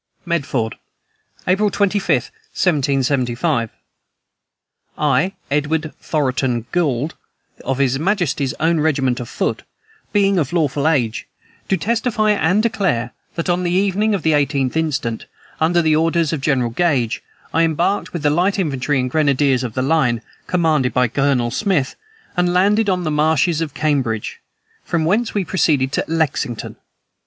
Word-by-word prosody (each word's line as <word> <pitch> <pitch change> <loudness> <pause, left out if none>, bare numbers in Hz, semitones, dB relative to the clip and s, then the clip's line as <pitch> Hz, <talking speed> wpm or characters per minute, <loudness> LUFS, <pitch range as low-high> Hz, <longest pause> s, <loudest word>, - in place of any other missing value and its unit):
"MEDFORD, 140 -9 -1 0.7
April 200 +3 +3
25, 200 0 0 0.5
1775. 135 -4 +1 1.3
"I, 150 +6 +1 0.2
Edward 150 +2 0
Thoroton 130 -5 -1
Gould, 150 -4 0 0.5
of 135 - -1
his 135 -1 +1
majesty's 160 - 0
own 165 0 +2
regiment 135 -5 +1
of 120 - -6
foot, - - -2 0.5
being 200 -2 +3
of 150 0 -2
lawful 150 -3 +1
age, 125 -9 0 0.4
do 190 - +1
testify 220 -1 +1
and 200 +1 +2
declare, 190 - 0 0.2
that, 165 - -3
on 175 0 +1
the 175 - -1
evening 200 +3 +1
of 195 - -4
the 160 - +3
18th 140 -3 +1
instant, 135 -8 -2 0.3
under 170 +2 +2
the 155 -1 +3
orders 165 0 +1
of 150 - -2
General 130 -4 +1
Gage, 130 -5 0 0.3
I 165 - +3
embarked 165 +5 0
with 170 -3 -5
the 145 - +3
light 180 +6 +1
infantry 145 -5 0
and 130 - 0
grenadiers 140 -2 +2
of 120 -3 -5
the 130 - 0
line, 130 -6 +1 0.2
commanded 155 -7 +1
by 125 -1 +3
Colonel 135 -2 +1
Smith, 180 - 0 0.4
and 180 -1 +2
landed 205 +3 +3
on 180 -1 0
the 155 - -1
marshes 155 +2 +2
of 155 -3 -4
Cambridge, 135 -8 -1 0.4
from 165 -2 -1
whence 215 +8 +1
we 200 -3 0
proceeded 145 -7 +1
to - - 0
Lexington. 150 -7 -2
155 Hz, 145 wpm, -19 LUFS, 135-175 Hz, 1.3 s, April